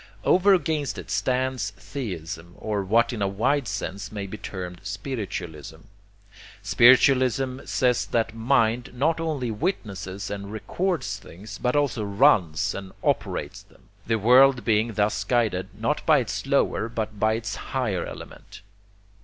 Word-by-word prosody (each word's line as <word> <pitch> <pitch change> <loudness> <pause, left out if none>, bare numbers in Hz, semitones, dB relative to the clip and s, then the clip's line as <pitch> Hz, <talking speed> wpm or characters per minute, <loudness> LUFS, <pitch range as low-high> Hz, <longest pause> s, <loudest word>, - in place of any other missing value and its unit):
Over 190 - +5
against 155 - -1
it - - -8
stands 130 -4 0
'theism,' 85 - -6
or 105 -2 -2
what 115 +6 +2
in 110 - -4
a 100 - +2
wide 120 +7 0
sense 100 -2 -4
may 100 -2 -4
be 100 - -7
termed 90 -4 -7
'spiritualism.' 95 - -6 0.8
Spiritualism 130 +1 +4
says 125 -2 +1
that 115 -1 0
mind 115 0 +1
not 155 +6 +1
only 150 -7 -2
witnesses 100 - -4
and 100 0 -6
records 140 - -2
things, 100 +1 -11
but 125 +2 0
also 140 -7 +1
runs 100 - +3
and 95 -1 -8
operates - - -1
them: - - -24 0.2
the 115 0 +2
world 125 +2 +5
being 110 0 +2
thus 105 +1 0
guided, 110 -7 0
not - - -1
by - - +6
its - - -3
lower, 110 - +1
but 110 -2 -4
by 110 +1 +3
its 110 0 -3
higher 110 -10 -2
element. - - -10
110 Hz, 140 wpm, -25 LUFS, 100-130 Hz, 0.8 s, by